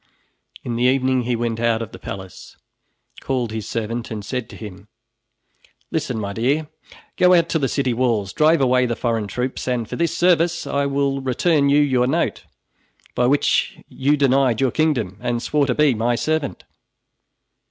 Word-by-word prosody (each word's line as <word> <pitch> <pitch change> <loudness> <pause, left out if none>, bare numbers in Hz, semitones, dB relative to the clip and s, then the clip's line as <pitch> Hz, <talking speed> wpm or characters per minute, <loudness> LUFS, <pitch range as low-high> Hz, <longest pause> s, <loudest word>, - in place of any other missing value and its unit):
In 120 -1 -3
the 120 - +1
evening 130 -1 +2
he 120 0 0
went 115 -1 -2
out 115 -1 +1
of 110 - -9
the - - -11
palace, 95 -1 -9 0.6
called 125 -4 -2
his 110 -2 -5
servant 115 +1 -3
and 105 -3 -6
said 125 0 -4
to - - -11
him: 105 -2 -10 1.0
"Listen, 150 -7 -2
my 100 -1 -4
dear! 140 +8 0 0.5
Go 180 0 +5
out 170 -1 +2
to 160 - +1
the 135 - +1
city 130 -1 0
walls, 115 -5 0
drive 155 0 +3
away 125 -1 +3
the 120 - -2
foreign 115 -3 -1
troops, 125 +6 -4
and 120 -3 -1
for - - -6
this 170 0 0
service 170 -1 +2
I 140 0 0
will 140 0 0
return 140 +3 +1
to 140 - +4
you 150 - +5
your 130 -4 +2
note, 160 +6 -1 0.7
by 125 - +1
which 140 +3 +1
you 145 +3 +1
denied 135 -4 +2
your 135 -2 +2
kingdom 125 - 0
and 120 -1 -1
swore 145 +3 0
to 125 - 0
be 150 -3 +4
my 120 +2 0
servant." 155 +3 -2
125 Hz, 180 wpm, -21 LUFS, 115-145 Hz, 1.0 s, Go